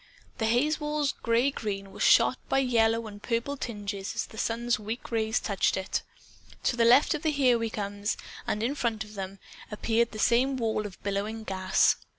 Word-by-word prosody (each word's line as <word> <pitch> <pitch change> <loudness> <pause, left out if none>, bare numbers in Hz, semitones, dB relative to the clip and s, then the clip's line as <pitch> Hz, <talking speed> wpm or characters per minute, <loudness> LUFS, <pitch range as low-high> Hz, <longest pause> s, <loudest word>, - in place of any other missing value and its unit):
The 220 - +1
hazewall's 295 +4 +1
gray 235 +4 +1
green 200 -5 -4
was - - -9
shot 255 - +5
by - - +2
yellow 230 -3 +2
and 205 -1 -9
purple 235 +5 -1
tinges 205 -6 -5
as - - -1
the 220 - -14
sun's 235 0 0
weak 220 +4 -6
rays 220 0 +1
touched 200 -3 0
it. 190 0 -2 0.6
To - - +1
the 235 -1 +3
left 250 +5 +6
of 305 - -3
the 315 - +1
Here 260 -5 +3
We 230 0 -1
Comes, 205 -1 -3 0.3
and 210 - -1
then 235 - +2
in - - -2
front 230 -5 -1
of 210 0 -13
them, 195 -1 -6 0.3
appeared 225 +2 +1
the 215 - -8
same 250 +5 +3
wall 220 -3 -1
of 190 - -13
billowing 205 +3 -2
gas. 190 -2 +2
225 Hz, 190 wpm, -28 LUFS, 210-245 Hz, 0.6 s, left